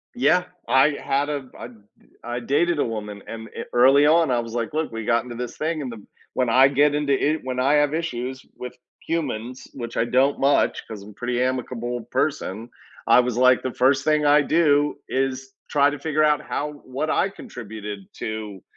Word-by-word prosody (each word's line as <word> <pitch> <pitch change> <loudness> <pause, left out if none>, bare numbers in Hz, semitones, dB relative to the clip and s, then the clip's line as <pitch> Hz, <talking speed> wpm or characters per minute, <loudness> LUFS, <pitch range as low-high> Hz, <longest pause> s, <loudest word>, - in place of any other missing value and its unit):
Yeah, 180 -7 +3 0.2
I 130 +4 +5
had 140 +2 0
a 140 -3 -4
I - - -7
d 120 - -16 0.5
I 120 +1 -4
dated 155 +7 +1
a - - +2
woman 105 -3 -6
and 115 0 -7
e - - -3
early 135 +4 +6
on 160 0 +4
I 120 - +2
was 115 -1 -6
like, 120 +3 -2
"Look, 155 -3 -1
we 115 -1 -5
got 115 +2 +2
into 120 -1 -8
this 120 0 -6
thing 155 0 -2
and 130 - -5
them, 110 -3 -11 0.3
when 125 -2 0
I 130 +3 +6
get 145 +2 +3
into 145 -1 +1
it, 150 +3 0
when 130 0 -3
I 135 +3 +3
have 145 0 +2
issues 130 -5 -4
with 125 0 -8 0.3
humans, 130 -7 -3
which 120 -3 -7
I 115 - +2
don't 130 +4 +2
much 140 +1 +2
'cause 110 -3 -8
I'm 105 - -12
a - - -13
pretty 120 +3 -2
amicable 125 -1 -2
person," 130 -6 -2 0.4
I - - +7
was, 125 -1 -3
like, 130 0 +4
"The 130 - -3
first 135 +2 +3
thing 150 -1 +2
I 145 0 +6
do 145 -2 +2
is 135 0 -2 0.2
try 145 -1 +4
to 145 - -5
figure 155 -1 0
out 150 -1 +3
how 150 +1 -3
what 135 +4 -3
I 195 - +2
contributed 105 - -8 0.2
to 105 -4 -6
130 Hz, 205 wpm, -23 LUFS, 120-145 Hz, 0.5 s, I